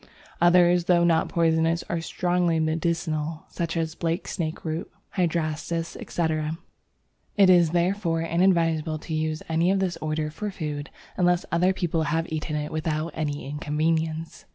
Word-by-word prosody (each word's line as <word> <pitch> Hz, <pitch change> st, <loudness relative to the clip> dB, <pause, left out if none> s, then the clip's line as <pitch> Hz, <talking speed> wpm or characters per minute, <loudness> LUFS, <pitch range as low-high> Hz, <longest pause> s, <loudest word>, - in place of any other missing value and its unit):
Others, 175 Hz, 0 st, +5 dB
though 175 Hz, -1 st, +4 dB
not 165 Hz, -2 st, +3 dB
poisonous, 165 Hz, 0 st, +2 dB
are 170 Hz, -1 st, -2 dB
strongly 175 Hz, -1 st, +1 dB
medicinal, 160 Hz, -1 st, -1 dB
such 170 Hz, -1 st, -3 dB
as 160 Hz, -1 st, -1 dB
Blake 170 Hz, +2 st, -2 dB
Snakeroot, 160 Hz, 0 st, -3 dB, 0.2 s
Hydrastis, 165 Hz, -2 st, -1 dB
etc. 160 Hz, -1 st, -2 dB, 0.8 s
It 195 Hz, -2 st, +7 dB
is 175 Hz, -3 st, +5 dB
therefore 175 Hz, 0 st, +1 dB
inadvisable 165 Hz, -3 st, +2 dB
to 160 Hz, -, -7 dB
use 155 Hz, 0 st, -1 dB
any 165 Hz, +2 st, +2 dB
of 195 Hz, -, +3 dB
this 185 Hz, -3 st, -1 dB
order 155 Hz, -1 st, -2 dB
for 210 Hz, +7 st, -4 dB
food 150 Hz, -6 st, -5 dB, 0.3 s
unless 180 Hz, -1 st, +2 dB
other 180 Hz, +3 st, +3 dB
people 170 Hz, -3 st, -1 dB
have 165 Hz, +2 st, 0 dB
eaten 155 Hz, 0 st, -3 dB
it 150 Hz, 0 st, -3 dB
without 155 Hz, +1 st, -2 dB
any 145 Hz, -3 st, -3 dB
inconvenience! 160 Hz, +2 st, -2 dB
165 Hz, 140 wpm, -25 LUFS, 155-175 Hz, 0.8 s, It